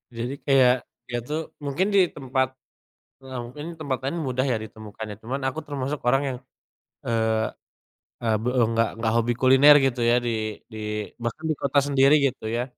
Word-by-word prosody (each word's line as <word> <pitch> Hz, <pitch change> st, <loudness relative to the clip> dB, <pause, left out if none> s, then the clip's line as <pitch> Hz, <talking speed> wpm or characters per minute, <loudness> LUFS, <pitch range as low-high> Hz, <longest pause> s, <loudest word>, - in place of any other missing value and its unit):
Jadi 120 Hz, +3 st, -3 dB
kayak 130 Hz, -3 st, +6 dB, 0.3 s
dia 120 Hz, -, -2 dB
tuh 150 Hz, +1 st, -2 dB, 0.2 s
mungkin 145 Hz, +6 st, -1 dB
di 190 Hz, -3 st, +5 dB
tempat 130 Hz, -3 st, -1 dB, 0.7 s
ya 130 Hz, -1 st, -8 dB
mungkin 130 Hz, +5 st, -9 dB
di -, -, -10 dB
tempat 140 Hz, -4 st, -1 dB
lain 140 Hz, +6 st, -2 dB
mudah 130 Hz, 0 st, 0 dB
ya -, -, +2 dB
ditemukannya. 110 Hz, -1 st, -8 dB
Cuman 130 Hz, +5 st, -3 dB
aku 135 Hz, +4 st, -3 dB
termasuk 140 Hz, 0 st, -3 dB
orang 135 Hz, +3 st, +4 dB
yang, 130 Hz, -2 st, -3 dB, 0.7 s
eee, 110 Hz, -1 st, +1 dB, 0.8 s
e -, -, -1 dB, 0.2 s
be 120 Hz, -, -1 dB, 0.2 s
enggak 115 Hz, 0 st, +1 dB
enggak 115 Hz, -1 st, 0 dB
hobi 115 Hz, +1 st, +2 dB
kuliner 135 Hz, +3 st, +7 dB
gitu 130 Hz, -2 st, 0 dB
ya 120 Hz, -, +5 dB
di -, -, +1 dB, 0.4 s
di 110 Hz, -, -7 dB, 0.4 s
bahkan 115 Hz, +7 st, -4 dB
di -, -, +2 dB
kota 140 Hz, +1 st, +1 dB
sendiri 140 Hz, 0 st, +4 dB
gitu 125 Hz, -, -4 dB
ya. 120 Hz, +2 st, -1 dB
130 Hz, 175 wpm, -25 LUFS, 115-140 Hz, 0.8 s, kuliner